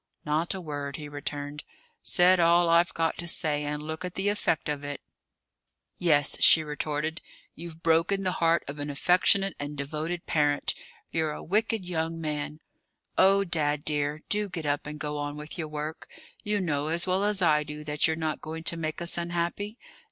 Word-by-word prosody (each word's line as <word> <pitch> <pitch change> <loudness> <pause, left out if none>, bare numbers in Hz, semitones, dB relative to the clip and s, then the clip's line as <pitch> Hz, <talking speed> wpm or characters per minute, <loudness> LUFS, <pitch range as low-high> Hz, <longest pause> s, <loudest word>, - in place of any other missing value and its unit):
"Not 160 +5 0
a - - -4
word," 145 -3 -5
he 150 0 -7
returned. 145 0 -5 0.4
"Said 180 +1 +4
all 170 0 +5
I've 170 +1 +4
got 165 -1 0
to 170 - -5
say. 150 -3 +2
And 150 0 -3
look 160 +3 -5
at 180 -1 -5
the 195 +2 +1
effect 205 -6 0
of 145 -1 -3
it!" 145 -1 -5 1.0
"Yes," 145 -5 +4
she 160 - +8
retorted. 150 +1 -3 0.3
"You've 165 0 -10
broken 165 +4 +2
the 185 - +1
heart 165 0 +3
of 145 +1 -6
an 145 +1 -4
affectionate 180 +5 +3
and 145 +1 -5
devoted 155 +5 -4
parent. 145 -2 +1 0.4
You're 160 -2 0
a - - -8
wicked 215 +1 0
young 165 -1 -2
man. 150 -1 -4 0.5
Oh, 195 +1 +5
dad 150 -5 -1
dear, 150 0 -1
do 210 -1 0
get 170 -4 -5
up 145 0 -1
and 150 0 -7
go 150 -1 -3
on 145 0 -4
with 150 +4 -8
your 160 - -2
work! 150 +1 -6 0.3
You 210 0 0
know 150 -4 -1
as 170 +2 +1
well 185 +1 +1
as 205 -2 +3
I 150 -2 +4
do 150 0 -8
that 150 +1 +1
you're 160 - 0
not 160 -1 -2
going 160 +1 -6
to 170 - 0
make 155 +1 -3
us 170 0 0
unhappy? 175 +5 -2
160 Hz, 190 wpm, -28 LUFS, 150-175 Hz, 1.0 s, she